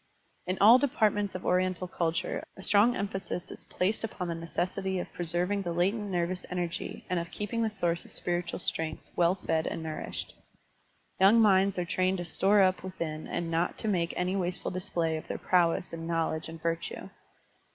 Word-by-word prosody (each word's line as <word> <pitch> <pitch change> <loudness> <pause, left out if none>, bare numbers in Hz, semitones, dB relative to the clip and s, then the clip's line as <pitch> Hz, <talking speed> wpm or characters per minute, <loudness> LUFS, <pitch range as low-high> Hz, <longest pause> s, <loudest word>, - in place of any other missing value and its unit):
In 185 +1 -1
all 225 +5 +8
depart 245 -7 +2
ments 205 -2 -2
of 185 - -5
Oriental 185 0 +1
culture 170 -2 -1
a 190 - -5
strong 215 +5 +5
emphasis 195 -3 -4
is - - -8
placed 200 +5 0
upon 190 -5 -4
the - - -1
necessity 180 +3 -2
of 180 - -5
preserving 175 +4 0
the 175 -3 -3
latent 200 +5 0
nervous 180 0 -1
enei^ 175 -2 -3
and 180 -1 0
of 170 0 -5
keeping 210 +3 -3
the 225 - +2
source 175 -5 -1
of - - -15
spiritual 175 -1 -1
strength 160 -3 -2
well 175 +1 +3
fed 160 -4 -1
and 165 - -3
nourished; 155 -1 -4 0.9
Yotmg 200 +4 +7
minds 195 -3 +4
are 180 - 0
trained 185 +2 +1
to 175 - -4
store 195 +4 +4
up 185 0 +2
within 165 -4 -5
and 170 -1 -3
not 165 +2 0
to 220 - -4
make 175 -5 +1
any 180 +2 0
wasteful 180 -2 -2
display 175 -4 -1
of 155 - -8
their - - -3
prowess 175 -1 +2
and 165 0 -5
knowledge 160 -1 -1
and 165 0 -8
virtue. 165 0 -3
180 Hz, 185 wpm, -29 LUFS, 170-195 Hz, 0.9 s, all